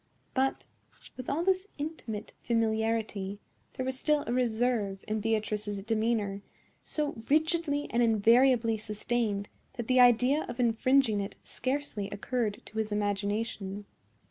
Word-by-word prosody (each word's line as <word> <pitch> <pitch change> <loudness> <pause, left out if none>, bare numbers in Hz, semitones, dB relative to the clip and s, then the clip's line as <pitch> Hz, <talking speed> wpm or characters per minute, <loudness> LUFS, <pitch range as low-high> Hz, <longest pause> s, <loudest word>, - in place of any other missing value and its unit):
But, 270 0 0 0.5
with 255 - -6
all 305 +5 0
this 380 +1 +1
intimate 285 -8 -5
familiarity, 220 -3 0 0.4
there 260 - -2
was 260 0 -3
still 300 0 +2
a 235 - -1
reserve 230 -5 0
in 215 0 -1
Beatrice's 210 -2 -1
demeanor, 215 -2 0 0.4
so 300 -4 -2
rigidly 315 -1 +2
and 235 - +2
invariably 230 +1 +4
sustained 210 -1 -2 0.3
that 240 -3 -4
the 255 0 +4
idea 250 +4 +5
of 240 +1 -6
infringing 235 -1 +3
it 195 - -5
scarcely 255 -6 -3
occurred 215 0 -2
to 220 - -6
his 215 -1 -1
imagination. 205 0 -2
230 Hz, 125 wpm, -30 LUFS, 210-260 Hz, 0.5 s, idea